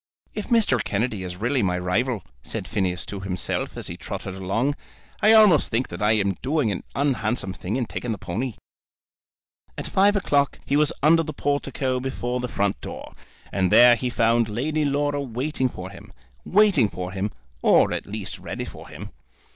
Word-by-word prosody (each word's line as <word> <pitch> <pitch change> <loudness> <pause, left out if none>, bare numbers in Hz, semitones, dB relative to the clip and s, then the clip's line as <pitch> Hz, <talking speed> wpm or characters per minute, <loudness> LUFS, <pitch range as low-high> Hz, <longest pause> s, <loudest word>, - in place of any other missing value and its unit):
"If 210 - -5
Mr. 215 - +3
Kennedy 110 -1 -1
is 90 -1 -6
really 120 +6 +1
my 90 -3 +1
rival," 100 +4 0 0.2
said 60 - -5
Phineas 90 -2 -1
to 100 - -6
himself, 95 -2 -3
as - - -5
he - - -5
trotted 95 - -6
along, 100 +9 0 0.5
"I 215 - +6
almost 210 -8 +6
think 120 +3 -1
that 85 - -7
I 105 +1 +4
am 100 -3 +1
doing 140 -4 +1
an 90 - -4
unhandsome 120 -7 0
thing 95 +4 -4
in 125 -2 0
taking 120 +1 -4
the 110 - -2
pony." 110 +7 -4 1.2
At - - -4
five 200 +2 +3
o'clock 145 -8 +1
he 140 - 0
was 150 0 +4
under 165 +2 +6
the 155 -1 -5
portico 140 -2 -1
before 125 -1 -3
the 125 - -2
front 100 -3 -1
door, - - -8 0.4
and 95 -2 +1
there 120 0 +8
he 125 +2 -2
found 115 -1 +2
Lady 150 +8 -1
Laura 145 0 0
waiting 130 +1 -1
for 95 -4 -8
him, - - -13 0.3
waiting 190 - +4
for 90 -1 -5
him, 95 +2 -2 0.3
or - - +4
at - - -4
least 105 -1 -5
ready - - -5
for - - -11
him. - - -9
120 Hz, 180 wpm, -24 LUFS, 100-145 Hz, 1.2 s, there